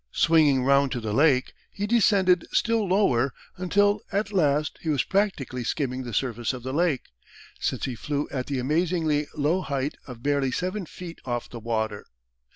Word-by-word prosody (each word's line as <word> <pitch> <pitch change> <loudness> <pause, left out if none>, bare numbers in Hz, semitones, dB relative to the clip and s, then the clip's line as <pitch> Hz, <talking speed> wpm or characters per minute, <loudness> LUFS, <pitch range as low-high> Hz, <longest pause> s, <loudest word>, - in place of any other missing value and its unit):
Swinging 150 -5 +4
round 140 0 +3
to 120 - -2
the 110 -2 -3
Lake 135 0 +3 0.2
he 200 - -4
descended 200 -5 +3
still 230 -3 +1
lower 140 - +2 0.2
until 205 +3 +2
at 205 +1 -1
last 150 -4 +1
he 160 - -3
was 145 -5 +2
practically 185 -11 -1
skimming 130 0 -2
the 120 -2 -6
surface 120 +1 -1
of 125 -2 -7
the 130 +1 -4
Lake, 160 -3 0 0.5
since - - -1
he 130 - -3
flew 145 +5 -3
at 130 -2 -3
the 140 - -2
amazingly 155 +2 0
low 155 +5 +1
height 140 -3 -2
of 125 -2 -10
barely 140 -2 +1
seven 185 +5 -3
feet 170 0 -9
off 120 -2 -4
the 120 - -7
water. 110 -2 -2
145 Hz, 170 wpm, -26 LUFS, 130-180 Hz, 0.5 s, Swinging